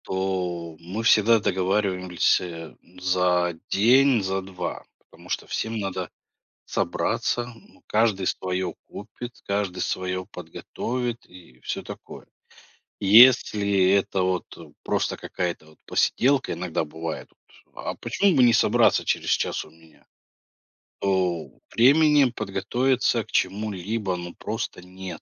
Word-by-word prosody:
То, 90 -3 -3
мы 95 +7 -5
всегда 115 0 +5
договариваемся 90 -4 0 0.2
за 90 -1 +1 0.2
день, 125 +3 +4
за 95 0 -1
2, 90 -2 -6
потому - - -19
что - - -2
всем 110 0 -3
надо 95 -4 -3 0.5
собраться. 120 0 -1
Ну, 115 - -21
каждый 105 -3 +1
свое 95 0 -2
купит, 120 0 -9
каждый 100 -2 -2
свое 90 0 -2
подготовит 120 +3 -5
и 85 -9 -16
всё - - -4
такое. - - -10 0.7
Если 100 -3 +6
это 100 -1 +2
вот 90 -1 0 0.4
просто - - -1
какая-то 90 -3 -4
вот 80 - -21
посиделка, 135 +1 +2
иногда 85 -2 -2
бывает: 80 +1 -6 0.5
"А - - -5
почему 200 -4 +1
бы 130 - +5
не 120 -1 +6
собраться 115 - +4
через - - -1
час - - 0
у - - -17
меня?" 80 -1 -22 0.9
То 90 -4 0 0.2
времени 145 +4 +5
подготовиться 120 +3 0
к - - -19
чему-либо, 100 0 -1
ну, 85 0 -8
просто 110 -4 -5
нет. 95 0 -8
95 Hz, 115 wpm, -24 LUFS, 90-115 Hz, 0.9 s, Если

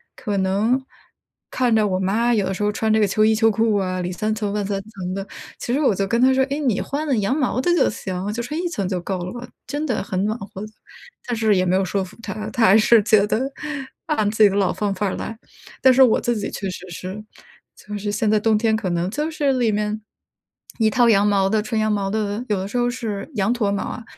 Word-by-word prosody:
可 210 -5 -3
能 205 +7 +1 0.7
看 245 -3 +2
着 215 -1 +3
我 185 -1 -1
妈 225 +6 +1
有 205 -4 +1
的 190 - -1
时 210 - -3
候 210 - +2
穿 220 +1 -1
这 220 - +4
个 210 - +4
秋 215 +2 +2
衣 220 0 +4
秋 225 0 +4
裤 220 0 +1
啊， 185 -2 -1
里 180 +1 -3
3 215 +4 -1
层 210 -2 -2
外 210 -1 -1
3 195 0 -2
层 195 -3 -6
的， 195 +1 -5 0.3
其 - - -4
实 285 - +1
我 260 - +3
就 195 +1 -1
跟 235 +4 +1
她 260 +1 +5
说， 265 0 +3
诶， 280 +2 -3
你 250 -9 0
换 295 +3 -3
了 275 - +2
羊 210 +7 +1
毛 255 -2 0
的 350 - +1
就 315 - +3
行， 190 0 -4
就 235 - -3
穿 300 +6 -4
1 355 - -1
层 200 - -2
就 185 -2 -1
够 185 +1 -3
了 175 +1 -5
吧， 245 - -9 0.2
真 295 +2 -3
的 245 -7 -1
很 190 -1 -2
暖 215 +1 0
和。 195 -1 -8 0.6
但 245 - -1
是 220 -2 +3
也 185 - +2
没 185 - +2
有 190 0 +2
说 195 +1 -1
服 185 - -12
她， 215 0 -5
她 235 - +2
还 195 - +6
是 220 +1 +5
觉 210 -1 +4
得 220 - 0 0.7
按 215 -10 +1
自 220 - -2
己 205 - +7
的 195 - -3
老 195 -3 +2
方 205 -1 -1
法 205 +2 -2
儿 - - -2
来， 220 - -6 0.5
但 260 -1 +7
是 265 - +4
我 240 - +4
自 240 -1 0
己 205 - -3
确 195 - -4
实 180 0 -9
是， 185 +4 -7 0.5
就 210 - -9
是 205 0 -3
现 210 +1 0
在 215 - +4
冬 220 0 +2
天 220 0 +2
可 220 -4 -2
能 175 0 0
就 300 +4 -2
是 285 -3 +1
里 240 -3 +1
面 210 +1 -2 0.8
一 220 - +4
套 240 0 +3
羊 200 -2 +4
毛 195 -1 +2
的 215 0 +2
纯 220 0 -2
羊 215 0 +1
毛 200 -2 -1
的， 215 +2 -2
有 210 - +1
的 190 - -4
时 235 - -4
候 245 0 +2
是 225 -4 -4
羊 200 +2 +1
驼 215 -5 0
毛 200 - -1
啊， 240 - -6
215 Hz, 275 characters per minute, -21 LUFS, 195-235 Hz, 0.8 s, 己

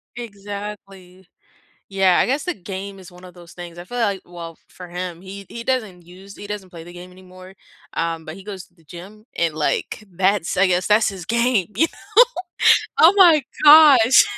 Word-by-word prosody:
Exactly. 200 -4 -10 0.6
Yeah, 195 -2 +2
I - - +2
guess 275 +4 -2
the 360 - -3
game 195 +1 -8
is 180 - -14
one 180 +1 -16
of 180 -1 -14
those 175 -1 -15
things, 175 -1 -11
I 175 - -9
feel, 245 +6 -7
like, 200 -4 -1
well, 170 -2 -10
for 180 - -12
him, 180 -1 -6
he 195 +1 -10
he 235 0 -9
doesn't 215 -9 -3
use 190 +3 -15
he 205 - -10
doesn't 200 -3 -7
play 165 -2 -11
the 175 - -13
game 180 +1 -12
anymore. 185 +1 -16 0.4
Um, 165 -1 -3
but 155 - -9
he 195 - -14
goes 195 -3 -8
to 175 - -36
the 165 -3 -27
gym 195 +7 -13
and, 165 -2 -1
like, 155 +6 -3
that's, 190 0 0
I 190 0 +3
guess, 180 0 0
that's 215 +1 +3
his 190 -3 -7
game, 235 -4 0
you 320 - +2 0.9
know? - - -11
Oh 370 - +4
my 335 -6 +6 0.2
gosh. 290 -5 +7
190 Hz, 195 wpm, -20 LUFS, 180-210 Hz, 0.9 s, gosh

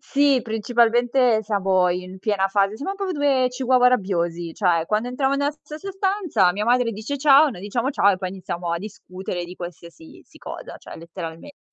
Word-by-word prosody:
sì, 280 -2 +2
principalmente 235 +2 +2
siamo 190 -3 +2
in 185 +1 -5
piena 195 -1 0
fase 200 +1 +1
siamo 385 - -4
proprio 390 -2 -3
2 280 -4 +2
chihuahua 250 0 +2
rabbiosi, 175 -7 -1
cioè 175 -5 +1
quando 215 +4 0
entriamo 270 +2 0
nella 285 +1 +1
stessa 310 +6 -9
stanza 380 - +1
mia 205 +3 -2
madre 245 0 +2
dice: 220 +6 -5
"Ciao". 285 +1 +6
Noi 225 -10 -8
diciamo: 235 +6 -2
"Ciao", 200 -7 +3
e 190 - 0
poi 185 -1 -4
iniziamo 180 -2 -5
a 170 - -1
discutere 185 -3 -7
di 175 - -10
qualsiasi 170 -2 -11
si - - -19
cosa, - - -8
cioè - - -11
letteralmente, 165 - -9
215 Hz, 180 wpm, -22 LUFS, 185-270 Hz, -, Ciao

